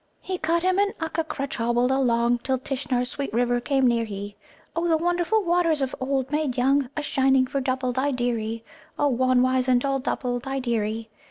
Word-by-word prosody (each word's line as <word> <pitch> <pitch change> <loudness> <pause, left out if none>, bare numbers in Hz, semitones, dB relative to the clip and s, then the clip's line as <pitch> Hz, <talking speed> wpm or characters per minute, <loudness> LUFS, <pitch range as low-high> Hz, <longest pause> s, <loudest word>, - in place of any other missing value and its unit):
"He 370 -1 -4
cut 335 +2 +1
him 370 +1 +2
an 405 0 +2
Ukka 320 0 -2
crutch, 275 -2 -4
hobbled 240 +2 +1
along, 240 -2 +2
Till 265 +2 -1
Tishnar's 250 -1 -2
sweet 280 -1 -4
river 245 +1 +1
came 270 +1 +1
near 235 -2 +3
he, 205 -1 -6 0.4
O 335 +1 0
The 325 -1 +3
wonderful 350 +5 +1
waters 345 -3 +2
of 265 -2 -2
'Old 265 0 -1
Made 295 -4 -1
Young,' 270 +1 +2
A 300 - -1
shining 265 -2 +3
for 275 +2 -2
Dubbuldideery, 250 -3 -1 0.3
O, 290 - +2
Wan, 255 0 +3
wizened 255 0 +2
old 270 -1 0
Dubbuldideery. 240 -4 -2
260 Hz, 170 wpm, -25 LUFS, 245-290 Hz, 0.4 s, near